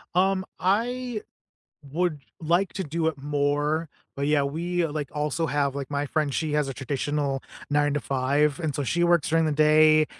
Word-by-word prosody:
Um, 190 +1 +2
I 230 +5 0 0.7
would 170 -1 0 0.2
like 175 +4 +1
to 190 - -3
do 160 +1 -1
it 160 -3 -1
more. 145 +2 0 0.3
But 140 +1 -1
yeah, 150 -1 +3
we 170 +4 -1
like, 150 -3 -4
also 150 +2 -1
have, 140 -2 0
like, 140 0 -5
my 145 0 -1
friend, 145 0 -1
she 155 +1 -1
has 150 -2 +1
a 135 - -4
traditional 140 +1 -2 0.3
9 145 0 +2
to 145 - 0
5. 140 +2 +1
And 155 -5 -2
so 145 - -1
she 175 +6 +1
works 175 -3 +3
during 165 0 +3
the 155 - +1
day, 155 +1 +5
150 Hz, 180 wpm, -26 LUFS, 145-170 Hz, 0.7 s, day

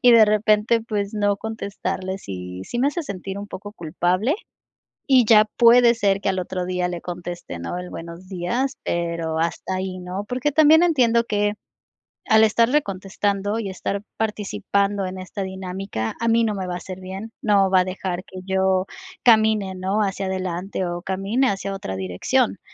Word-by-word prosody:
y 245 -1 +7
de 225 -2 +8
repente, 215 +2 +3
pues, 205 -1 -2
no 205 -1 +1
contestarles, 195 -3 -4
y 90 0 -6
sí 240 - -4
me 265 - +3
hace 335 +3 -3
sentir 195 -4 -6
un 205 0 -7
poco 205 +2 -8
culpable, 180 - 0 0.7
y 260 -4 +6
ya 215 -1 +6
puede 235 0 +7
ser 200 -3 +1
que - - -1
al 190 - 0
otro 180 0 -3
día 180 -1 -1
le 175 -1 -4
conteste, 175 - -6
¿no?, 85 - -4
el 180 0 -7
buenos 170 +2 -9
días, 205 +9 -2
pero 170 -2 -2
hasta 170 +2 -2
ahí, 185 0 -4
¿no?, 180 +3 -5
porque 255 +4 -1
también 315 +2 +6
entiendo 235 -8 +3
que 205 -1 0 0.8
al 220 0 +7
estarle 235 +7 +3
contestando 200 +2 -2
y 205 - -3
estar 195 +1 -3 0.2
participando 200 - -1
en 185 0 -5
esta 190 +2 -5
dinámica, 190 - -4
a 230 - +2
mí 230 0 +4
no 210 -2 -1
me 190 -2 -4
va 180 - -3
a - - -2
hacer 185 +1 -8
bien, 195 +4 -7
no 200 -3 +3
va 185 -1 +5
a - - +2
dejar 185 -1 -4
que 185 -2 -10
yo 190 0 +2 0.4
camine, 215 -4 +4
¿no?, 190 +3 0
hacia 195 -1 -1
adelante 185 0 -3
o 175 0 -4
camine 195 +8 0
hacia 195 0 -3
otra 95 - -5
dirección, 90 -1 0
195 Hz, 180 wpm, -23 LUFS, 185-220 Hz, 0.8 s, de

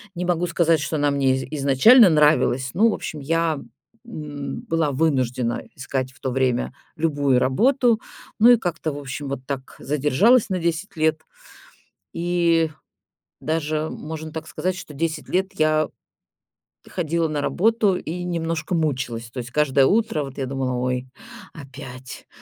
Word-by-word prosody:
Не 180 +1 -3
могу 175 0 0
сказать, 165 -1 +2
что 150 - -3
она 145 0 +2
мне 135 -2 +2
из 130 - -3 0.2
изначально 190 - +7
нравилась, 140 -4 +3
но, 220 +6 +4
в - - 0
общем, 155 - -5
я, 160 +1 0 0.5
м, 150 -3 -6
была 165 -5 +1
вынуждена 130 -5 0
искать 130 0 -3
в 130 - -23
то 130 - -3
время 125 -1 0 0.2
любую 145 -5 +2
работу. 240 - +2 0.4
Ну 230 +3 +7
и 240 - +7
как-то, 165 -6 -3
в 145 - -7
общем, 140 0 -6
вот 135 -1 -5
так 135 -1 -6
задержалась 150 - +3
на 185 -1 -1
10 170 +3 -2
лет. 155 0 +1 0.9
И 170 -2 +1 0.7
даже 155 0 -1
можно 155 0 -7
так 160 0 -7
сказать, 185 +3 -2
что 165 -5 -9
10 155 +2 -3
лет 190 +1 0
я 155 -1 +2 1.0
ходила 165 -1 -1
на 150 -1 -2
работу 210 +4 +2
и 175 0 -5
немножко 165 -1 -2
мучилась. 130 -7 -2
То 130 - -12
есть 120 0 -5
каждое 140 -1 +3
утро, 210 -5 +1
вот, 135 -1 -9
я 135 - -2
думала: 130 -1 -2
"Ой, 125 +1 -2 0.5
опять". 130 -3 -10
155 Hz, 155 wpm, -22 LUFS, 135-170 Hz, 1.0 s, изначально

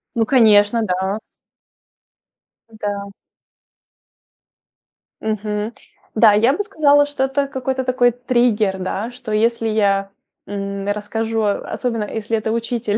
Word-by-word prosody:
Ну, 230 -1 +2
конечно, 220 -2 +4
да. 190 +1 -1 1.6
Да. 200 -1 -4 2.1
Мгм. 215 +1 -2 0.4
Да, 215 -1 +6
я 230 +6 +4
бы 415 - -1
сказала, 290 -7 +4
что 290 -2 -1
это 275 +1 -1
какой-то 265 -1 -2
такой 250 -1 +3
триггер, 240 -5 +1
да, 195 +5 -3
что 245 -2 -8
если 225 +1 +1
я, 200 -2 +1 0.4
м, 200 0 -4
расскажу, 220 +2 -2
особенно 225 +2 -2
если 220 +1 -2
это 220 0 -2
учитель, 230 -2 -1
220 Hz, 110 wpm, -19 LUFS, 205-245 Hz, 2.1 s, Да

